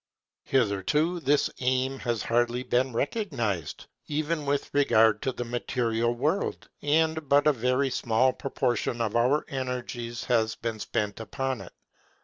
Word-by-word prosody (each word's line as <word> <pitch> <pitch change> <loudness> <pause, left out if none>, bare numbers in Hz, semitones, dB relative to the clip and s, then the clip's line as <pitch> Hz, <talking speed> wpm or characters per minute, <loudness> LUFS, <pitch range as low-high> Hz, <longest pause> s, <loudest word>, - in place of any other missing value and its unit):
Hitherto 135 - +1
this 145 -2 +2
aim 130 +1 0
has 120 -4 -2
hardly 120 +1 +1
been 130 +1 +1
recognized, 120 - -2 0.2
even 155 0 -2
with 140 0 -1
regard 110 -6 +4
to 135 - 0
the 120 -1 -5
material 120 -1 0
world, 155 +11 -1
and 160 0 +1
but 145 +1 +5
a 150 - +5
very 125 +2 +1
small 120 +3 +2
proportion 125 -3 -1
of 115 -2 -1
our 125 +6 +3
energies 125 -3 -4
has 110 -3 +1
been 115 -1 -4
spent 105 0 -2
upon 130 +3 -3
it. - - -11
125 Hz, 135 wpm, -27 LUFS, 115-140 Hz, 0.2 s, but